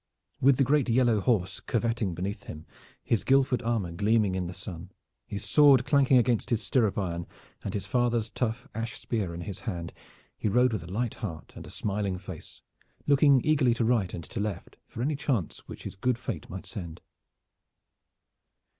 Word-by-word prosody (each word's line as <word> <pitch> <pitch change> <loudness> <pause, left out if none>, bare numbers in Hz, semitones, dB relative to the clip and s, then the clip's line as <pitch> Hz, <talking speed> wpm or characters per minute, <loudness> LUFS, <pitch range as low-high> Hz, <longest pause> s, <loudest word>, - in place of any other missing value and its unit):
With 135 +1 +5
the 135 - +4
great 140 0 +2
yellow 120 -2 +3
horse 95 -5 +1
curveting 115 -5 -1
beneath 100 +4 -4
him, 75 +1 -8 0.4
his 115 - +1
Guildford 135 -2 +3
armor 115 -7 -1
gleaming 105 +2 +2
in 90 -1 -2
the - - -5
sun, 90 0 -8 0.4
his 100 - -5
sword 140 -4 +6
clanking 140 -2 +4
against 120 -2 +2
his 115 -2 +1
stirrup 110 -4 +1
iron, 85 -4 -2 0.4
and 100 - -4
his 100 - -3
father's 120 -3 +1
tough 115 +1 -3
ash 110 0 -4
spear 115 -6 -2
in 85 - -6
his 100 +1 -6
hand, 85 -7 -5 0.4
he - - -2
rode 125 +3 +3
with 105 - -2
a 85 - -9
light 115 +3 -1
heart 80 - -7
and - - -9
a - - -10
smiling 100 -2 -2
face, 90 -3 -10 0.4
looking 140 -1 +5
eagerly 140 -6 +3
to 115 - 0
right 110 -6 +2
and 85 - -6
to - - -6
left 100 -4 -4
for 115 - -5
any 150 +3 0
chance 130 - -1
which - - -9
his - - -6
good 125 +5 0
Fate 115 - -5
might 95 +1 -7
send. 85 -6 -7
110 Hz, 180 wpm, -28 LUFS, 95-125 Hz, 0.4 s, sword